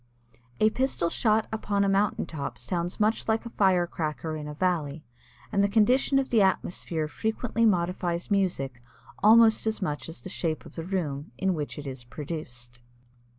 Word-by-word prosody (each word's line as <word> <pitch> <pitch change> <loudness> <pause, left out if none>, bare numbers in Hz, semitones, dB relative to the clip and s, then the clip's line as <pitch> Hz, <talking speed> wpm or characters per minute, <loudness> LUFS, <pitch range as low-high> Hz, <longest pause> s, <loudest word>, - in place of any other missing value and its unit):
A 215 0 +4
pistol 250 -9 0
shot 220 -1 +2
upon 205 -2 0
a - - +2
mountain 195 +1 +1
top 145 -4 -5
sounds 175 +1 -3
much 215 +1 +1
like 220 +1 +1
a 235 - -7
fire 185 -5 +3
cracker 155 -1 -3
in 150 -1 -6
a 150 - -6
valley, 160 -4 -1 0.5
and 200 - +2
the 200 - +3
condition 245 +6 +4
of 270 -1 0
the 225 -3 +5
atmosphere 175 -4 0
frequently 225 +6 0
modifies 175 -1 0
music 140 -11 0 0.4
almost 220 +1 +6
as 220 - 0
much 155 -5 -3
as 165 - -7
the - - -8
shape 165 -4 -2
of - - -12
the 165 - -5
room 155 -7 -3
in 190 +5 +1
which 150 -4 -4
it 150 - -7
is 130 -2 -6
produced. 125 -3 -7
180 Hz, 175 wpm, -27 LUFS, 155-215 Hz, 0.5 s, almost